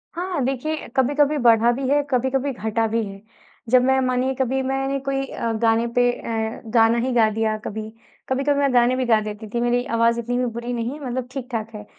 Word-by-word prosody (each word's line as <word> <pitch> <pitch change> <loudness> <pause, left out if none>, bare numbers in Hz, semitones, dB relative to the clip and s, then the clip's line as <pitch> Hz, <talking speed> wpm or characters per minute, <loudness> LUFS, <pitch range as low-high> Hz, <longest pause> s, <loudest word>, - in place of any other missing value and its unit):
हाँ, 350 -3 -2
देखिए, 275 +4 -3
कभी-कभी 290 +3 +2
बढ़ा 235 -2 +4
भी 260 +2 -2
है, 290 +1 +3
कभी-कभी 265 +2 0
घटा 225 -1 -1
भी 225 +1 0
है। 195 0 -9 0.5
जब 250 +1 +6
मैं 265 +1 +3
मानिए 255 +1 0
कभी 265 0 0
मैंने 270 +1 -1
कोई 270 0 0
अ, 230 - -3
गाने 230 0 +3
पे 245 0 +4
अ, 225 -1 -4
गाना 230 0 +4
ही 260 - -1
गा 225 -2 +4
दिया 220 0 -1
कभी, 215 +1 -5 0.4
कभी-कभी 275 +2 +1
मैं 275 -2 +2
गाने 245 +1 +4
भी 255 0 -1
गा 225 -2 +4
देती 215 +1 -6
थी 235 - 0
मेरी 240 0 +1
आवाज़ 230 +1 +3
इतनी 245 +1 -2
भी 250 - +1
बुरी 235 +1 -4
नहीं, 240 +5 -3
मतलब 255 -2 -4
ठीक-ठाक 240 -5 -4
है। 210 - -7
245 Hz, 205 wpm, -22 LUFS, 230-265 Hz, 0.5 s, जब